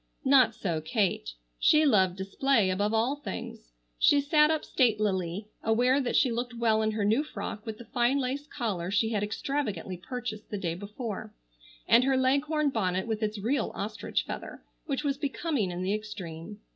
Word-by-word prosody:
Not 255 Hz, -5 st, +5 dB
so 165 Hz, -5 st, -2 dB
Kate. 160 Hz, -, 0 dB, 0.3 s
She 310 Hz, 0 st, +5 dB
loved 190 Hz, -9 st, +4 dB
display 195 Hz, +2 st, +1 dB
above 205 Hz, +3 st, 0 dB
all 230 Hz, +6 st, +1 dB
things. -, -, -7 dB, 0.3 s
She 290 Hz, -, +5 dB
sat 300 Hz, +1 st, +4 dB
up 315 Hz, -1 st, 0 dB
statelily, 205 Hz, -, +1 dB, 0.2 s
aware 250 Hz, +5 st, +3 dB
that 250 Hz, -, -1 dB
she 255 Hz, -, +4 dB
looked 240 Hz, +1 st, -3 dB
well 225 Hz, -2 st, +2 dB
in 215 Hz, -, +1 dB
her 215 Hz, -1 st, -1 dB
new 225 Hz, +8 st, +3 dB
frock 220 Hz, -7 st, -6 dB
with 220 Hz, -1 st, -4 dB
the 235 Hz, -, -11 dB
fine 245 Hz, +4 st, +1 dB
lace 275 Hz, +2 st, -2 dB
collar 200 Hz, -, -3 dB
she 205 Hz, +3 st, +2 dB
had 215 Hz, -3 st, -1 dB
extravagantly 215 Hz, -4 st, -3 dB
purchased 220 Hz, +2 st, -6 dB
the 205 Hz, -, -3 dB
day 170 Hz, -4 st, -2 dB
before, 205 Hz, +4 st, -6 dB, 0.5 s
and 240 Hz, -, +6 dB
her 265 Hz, 0 st, +2 dB
leghorn 280 Hz, +3 st, +2 dB
bonnet 185 Hz, -5 st, 0 dB
with 220 Hz, -1 st, -2 dB
its 215 Hz, 0 st, -1 dB
real 230 Hz, +5 st, 0 dB
ostrich 215 Hz, +2 st, -2 dB
feather, -, -, -7 dB, 0.2 s
which 280 Hz, -1 st, -2 dB
was 280 Hz, -2 st, 0 dB
becoming 285 Hz, -, -1 dB
in 175 Hz, +1 st, -4 dB
the 190 Hz, +2 st, 0 dB
extreme. 205 Hz, -3 st, -6 dB
220 Hz, 175 wpm, -28 LUFS, 200-265 Hz, 0.5 s, and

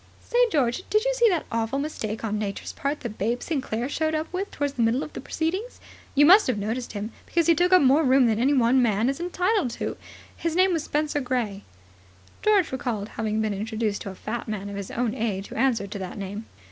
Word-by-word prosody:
Say, 480 Hz, -, +1 dB
George, 255 Hz, -1 st, +1 dB
did 425 Hz, +2 st, +2 dB
you -, -, +2 dB
see 475 Hz, -2 st, +4 dB
the 350 Hz, -5 st, 0 dB
awful 230 Hz, +3 st, -1 dB
mistake 230 Hz, -8 st, -4 dB
on 215 Hz, -1 st, -1 dB
Nature's 200 Hz, -2 st, -4 dB
part 295 Hz, -1 st, -3 dB
that 230 Hz, -4 st, -6 dB
Babe 235 Hz, +5 st, -1 dB
Sinclair 260 Hz, -6 st, -2 dB
showed 315 Hz, +2 st, -1 dB
up 310 Hz, +3 st, -3 dB
with 390 Hz, +2 st, -2 dB
towards 285 Hz, -1 st, -2 dB
the 245 Hz, -, -2 dB
middle 230 Hz, +4 st, +2 dB
of -, -, -9 dB
the -, -, -6 dB
proceedings? 370 Hz, +10 st, -3 dB, 0.4 s
You 290 Hz, +1 st, +6 dB
must 385 Hz, +7 st, +7 dB
have 250 Hz, -4 st, 0 dB
noticed 225 Hz, +5 st, -3 dB
him, 210 Hz, +2 st, -4 dB, 0.2 s
because 335 Hz, -1 st, +1 dB
he 335 Hz, -, +6 dB
took 355 Hz, +3 st, +2 dB
up 365 Hz, -4 st, +7 dB
more 275 Hz, +4 st, +5 dB
room 265 Hz, -1 st, +5 dB
than 225 Hz, -2 st, +2 dB
any 275 Hz, +4 st, +3 dB
one 250 Hz, +1 st, +4 dB
man 220 Hz, -2 st, +2 dB
was 270 Hz, +3 st, 0 dB
entitled 360 Hz, -, 0 dB
to. -, -, -3 dB, 0.4 s
His 335 Hz, -1 st, -2 dB
name 370 Hz, +1 st, +4 dB
was 320 Hz, -3 st, -1 dB
Spenser 295 Hz, -1 st, -1 dB
Gray." 240 Hz, -6 st, -2 dB, 0.8 s
George 410 Hz, -5 st, +3 dB
recalled 230 Hz, -5 st, -3 dB
having 220 Hz, -1 st, -2 dB
been 215 Hz, -1 st, 0 dB
introduced 215 Hz, +1 st, -2 dB
to -, -, -5 dB
a 190 Hz, -, -8 dB
fat 220 Hz, +5 st, -5 dB
man 205 Hz, -2 st, -4 dB
of -, -, -6 dB
his 200 Hz, -1 st, -5 dB
own 235 Hz, -2 st, -1 dB
age 205 Hz, -3 st, -2 dB
who -, -, -8 dB
answered 225 Hz, -5 st, +1 dB
to 205 Hz, -, -5 dB
that 185 Hz, +1 st, -6 dB
name. 205 Hz, +2 st, -6 dB
250 Hz, 230 wpm, -25 LUFS, 215-315 Hz, 0.8 s, must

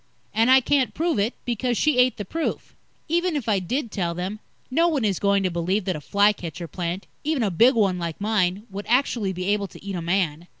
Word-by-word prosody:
And 225 Hz, +3 st, +3 dB
I 260 Hz, 0 st, +7 dB
can't 265 Hz, 0 st, +1 dB
prove 330 Hz, -7 st, 0 dB
it, 215 Hz, +5 st, 0 dB
because 240 Hz, 0 st, -1 dB
she 300 Hz, -4 st, +2 dB
ate 250 Hz, 0 st, +4 dB
the 205 Hz, -, -5 dB
proof. 325 Hz, -, -4 dB, 0.3 s
Even 345 Hz, +1 st, +1 dB
if 275 Hz, -6 st, -3 dB
I 205 Hz, -3 st, +2 dB
did 230 Hz, -, -3 dB
tell 170 Hz, -3 st, -2 dB
them, 185 Hz, +4 st, -4 dB, 0.3 s
no 330 Hz, +6 st, +3 dB
one 290 Hz, -9 st, 0 dB
is 195 Hz, -4 st, 0 dB
going 200 Hz, -1 st, +2 dB
to 185 Hz, -, 0 dB
believe 180 Hz, +4 st, -1 dB
that 185 Hz, -3 st, -1 dB
a 150 Hz, -, -6 dB
fly 205 Hz, +6 st, +3 dB
catcher 170 Hz, -2 st, -7 dB
plant 175 Hz, +3 st, -4 dB, 0.2 s
even 300 Hz, -4 st, 0 dB
a 200 Hz, -, 0 dB
big 235 Hz, +10 st, +5 dB
one 195 Hz, -5 st, +2 dB
like 170 Hz, -2 st, -4 dB
mine 200 Hz, -2 st, 0 dB
would 200 Hz, +1 st, -6 dB
actually 235 Hz, -5 st, +2 dB
be 185 Hz, 0 st, -4 dB
able 205 Hz, -1 st, +1 dB
to 190 Hz, -, -15 dB
eat 200 Hz, -, -4 dB
a 175 Hz, -, -3 dB
man. 170 Hz, -2 st, -1 dB
205 Hz, 230 wpm, -24 LUFS, 180-250 Hz, 0.3 s, I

